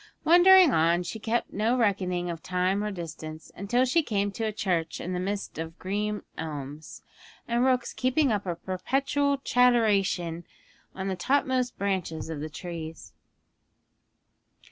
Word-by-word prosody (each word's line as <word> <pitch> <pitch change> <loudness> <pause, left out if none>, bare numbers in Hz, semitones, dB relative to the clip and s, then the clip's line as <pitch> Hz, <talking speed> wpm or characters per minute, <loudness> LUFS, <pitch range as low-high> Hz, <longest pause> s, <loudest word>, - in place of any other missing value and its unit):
Wandering 355 0 +7
on, 170 +2 +3
she 220 +5 -6
kept 230 +2 -1
no 225 +5 +1
reckoning 185 -6 0
of 165 -1 -7
time 185 +2 0
or 210 - -1
distance, 160 -4 -8
until 240 +7 +1
she 295 +7 +3
came 205 -7 -1
to 225 +3 -5
a - - -1
church 180 -6 -1
in 180 - -4
the 180 - -2
midst 195 -3 -4
of 165 +1 -6
green 210 +2 -2 0.2
elms, 150 -1 -7 0.4
and 235 +1 +1
rooks 255 -1 +1
keeping 260 +2 +1
up 205 -2 -1
a 175 - -1
perpetual 275 - 0
chatteration 210 -10 +2 0.5
on 190 0 -4
the 190 - -1
topmost 255 +4 0
branches 185 -5 -2
of 155 - -5
the 155 +2 -5
trees. 160 - -8
195 Hz, 145 wpm, -27 LUFS, 170-245 Hz, 0.5 s, Wandering